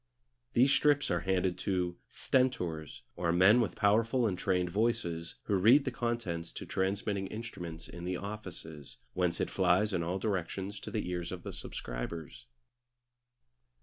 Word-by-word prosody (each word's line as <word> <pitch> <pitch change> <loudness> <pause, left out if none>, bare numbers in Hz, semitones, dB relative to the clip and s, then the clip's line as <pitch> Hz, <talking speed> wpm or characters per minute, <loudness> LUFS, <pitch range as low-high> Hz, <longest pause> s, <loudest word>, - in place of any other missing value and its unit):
These 130 +3 +5
strips 145 -5 +3
are 85 - +2
handed 90 +1 0
to 90 -3 -1
"stentors," 85 - 0
or 85 -2 0
men 95 +7 +6
with 115 - -1
powerful 115 +4 +3
and 100 -4 +1
trained 90 -1 0
voices, 100 -7 0
who - - -2
read 120 +10 +6
the 130 - -1
contents 115 -9 -2
to - - -6
transmitting 95 +1 -1
instruments 90 -7 -7
in 85 - -9
the 90 0 -2
offices, 90 -8 -8 0.2
whence 90 -2 0
it - - -1
flies 95 +3 +3
in 90 - +1
all 85 +3 -1
directions 95 0 -2
to - - -7
the 110 - -2
ears 90 -1 -3
of 90 -1 -6
the - - -6
subscribers. - - -6
95 Hz, 150 wpm, -32 LUFS, 85-110 Hz, 0.2 s, men